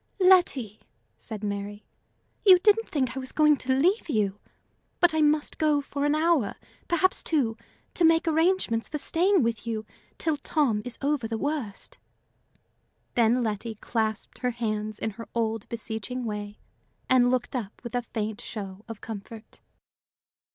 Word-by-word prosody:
"Letty," 350 - +4 0.4
said 215 - -7
Mary, 205 0 -4 0.6
"you 375 -3 +9
didn't 425 +4 +3
think 260 -4 -1
I - - -2
was 260 0 -5
going 300 -1 +5
to 260 0 0
leave 360 +6 +2
you! 210 -6 0 0.6
But 350 -3 +5
I 315 - +2
must 300 0 +2
go 305 -2 +3
for 280 0 -3
an 295 +1 +2
hour, 310 -9 +2 0.3
perhaps 370 +2 +2
two, 260 -9 0 0.4
to 350 - 0
make 325 +1 +4
arrangements 320 -8 +1
for 300 - -3
staying 355 +3 +2
with 230 0 -2
you 220 -1 -3 0.3
till 315 -3 0
Tom 275 -7 +1
is 245 - -5
over 280 -5 0
the 225 0 -3
worst." 280 -6 -4 1.1
Then 240 +1 +3
Letty 220 +1 -3
clasped 220 0 -3
her 250 - 0
hands 215 -3 -3
in 220 - -2
her 230 +3 -10
old, 225 -2 -1
beseeching 230 +2 -4
way, 210 -1 -5 0.5
and 250 -1 +5
looked 250 0 -1
up 220 -5 -4
with 235 - -7
a 245 - +1
faint 220 -2 -4
show 200 -2 -7
of 225 -2 -8
comfort. 220 +1 -9
245 Hz, 155 wpm, -27 LUFS, 220-305 Hz, 1.1 s, you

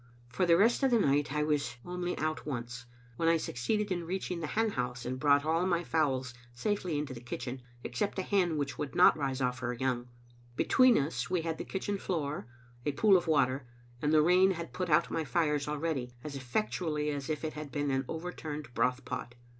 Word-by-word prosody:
For 125 +8 0
the 170 -1 +6
rest 230 +8 +4
of 270 - +4
the 240 - +4
night 145 -7 +2
I 150 +1 +1
was 150 -4 0
only 180 0 -3
out 155 0 -2
once, 125 -3 -5 0.3
when 165 - +2
I 165 - +4
succeeded 205 - -1
in 175 -2 -1
reaching 180 0 -3
the 160 - -3
hen 220 +6 +1
house 125 -4 -3
and 130 +1 -3
brought 145 0 +4
all 165 +2 +2
my 175 -2 +1
fowls 135 -6 0 0.2
safely 180 - -1
to 135 - -7
the 120 - -9
kitchen, 125 +1 -5 0.2
except 165 +13 -2
a 190 - 0
hen 180 -5 +1
which 140 -1 -3
would 145 - -4
not - - +7
rise 135 -3 -2
off 125 0 0
her 125 0 -2
young. 125 0 -1 0.5
Between 255 - +5
us 145 +5 -1
we 180 -2 0
had 160 -1 -3
the - - -4
kitchen 200 +1 -3
floor, 150 - -3 0.4
a 145 - -1
pool 200 +7 +5
of 175 -2 +2
water; 135 -4 +2 0.3
and 150 - +1
the 155 -1 +6
rain 180 +3 +5
had 170 -3 -4
put 180 -1 -2
out 150 - +3
my 160 - 0
fires 150 +1 0
already, 145 -5 -2
as 150 -2 -6
effectually 150 - -1
as 140 -1 -4
if 155 0 -2
it 155 - -2
had 150 -2 -7
been 145 -1 -1
an 135 0 0
overturned 155 -5 -5
broth 125 +2 +1
pot. 125 -1 -5
150 Hz, 210 wpm, -31 LUFS, 130-175 Hz, 0.5 s, not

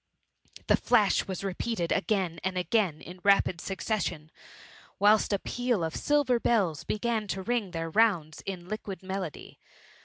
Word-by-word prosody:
The - - +4
flas^ - - +3
was 190 0 -4
repeated 195 -1 -2
again 190 -5 0
and 190 0 -1
again 180 -4 +1
in 180 +1 -10
rapid 195 -4 +3
succes 200 +1 -2
sion, 155 -2 -5 0.7
whilst 210 +2 +4
a 200 - +3
peaFof 215 -8 -1
silver 290 -5 +2
bells 195 -11 +1
began 220 0 -1
to 190 0 -3
ring 235 -2 -1
their 165 -2 -4
rounds 175 -8 +2
in 180 -3 -5
liquid 200 -2 -6
melody. 190 -4 -6
195 Hz, 145 wpm, -28 LUFS, 175-215 Hz, 0.7 s, The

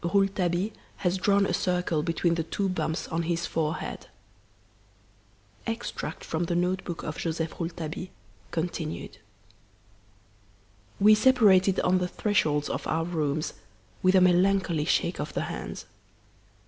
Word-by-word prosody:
Rouletabille 190 +1 +1 0.3
Has 180 +1 +2
Drawn 200 +1 +3
a - - -1
Circle 180 -3 0
Between 165 +1 +1
the 165 - 0
Two 195 +4 -2
Bumps 160 -3 -2
on 165 +1 -1
His 170 0 -1
Forehead 160 -1 -3 1.6
(EXTRACT 225 -8 -4
FROM 165 +2 -2
THE 170 - -1
NOTE 180 +2 0
BOOK 170 -2 -5
OF 155 0 -5
JOSEPH 165 -1 -3
ROULETABILLE, 165 0 -4 0.4
continued) 160 -9 -4 1.8
"We 210 +2 +7
separated 210 -5 +5
on 185 0 +3
the 180 - 0
thresholds 160 -8 +1
of - - -3
our 165 +1 0
rooms, 155 -3 -1 0.5
with 185 +1 +4
a 185 - +6
melancholy 180 -3 +3
shake - - +1
of - - -4
the - - 0
hands. - - -5
175 Hz, 130 wpm, -27 LUFS, 165-190 Hz, 1.8 s, We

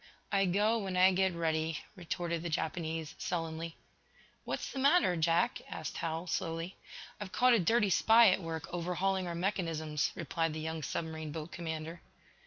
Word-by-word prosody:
"I 195 -1 +3
go 210 +5 +2
when 190 -3 -3
I 185 +1 +7
get 190 -1 +1
ready," 160 -1 0 0.2
retorted 170 -2 -3
the 170 - -3
Japanese, 160 0 -2
sullenly. 165 -1 -3 0.7
"What's - - -3
the 270 - -4
matter, 280 - +4
Jack?" 165 +1 +2
asked - - -5
Hal, 165 +1 -2
slowly. 165 +1 -3 0.4
"I've 205 -3 -6
caught 250 +4 +5
a 230 - +5
dirty 205 +3 +3
spy 225 +4 +7
at 190 - +1
work 165 -1 -4
overhauling 180 +2 0
our 170 - -3
mechanisms," 165 -5 -1
replied 165 -2 -1
the 155 - -4
young 160 0 -3
submarine 160 0 -4
boat 160 +2 -6
commander. 165 0 -5
170 Hz, 160 wpm, -32 LUFS, 160-190 Hz, 0.7 s, I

